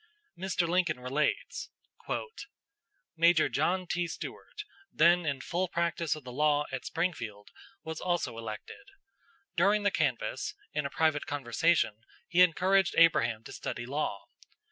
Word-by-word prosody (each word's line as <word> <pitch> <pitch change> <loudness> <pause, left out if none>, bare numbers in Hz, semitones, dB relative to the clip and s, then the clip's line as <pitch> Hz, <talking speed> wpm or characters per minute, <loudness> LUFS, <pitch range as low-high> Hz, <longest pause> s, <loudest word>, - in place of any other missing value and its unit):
Mr. 180 -1 -1
Lincoln 175 -6 +1
relates: 135 +4 -1 1.5
"Major 170 0 +4
John 180 +6 0
T. 175 0 -1
Stuart, 420 - -7 0.3
then 170 +1 +4
in 140 -3 -1
full 180 +6 -1
practice 170 -2 -1
of 155 - -10
the 125 - -8
law 150 +2 +2
[at - - -5
Springfield], 120 - -3 0.3
was 160 0 -6
also 175 -9 -1
elected. 110 - -8 0.7
During 200 +5 +3
the 205 - +3
canvass, 425 - -1 0.2
in 150 -2 -1
a - - -9
private 155 -1 +1
conversation 145 -2 +1 0.3
he 180 0 +3
encouraged 185 +2 +4
Abraham 115 -9 +4
to - - -10
study 120 - -5
law. 130 -6 -3
160 Hz, 130 wpm, -30 LUFS, 140-175 Hz, 1.5 s, Major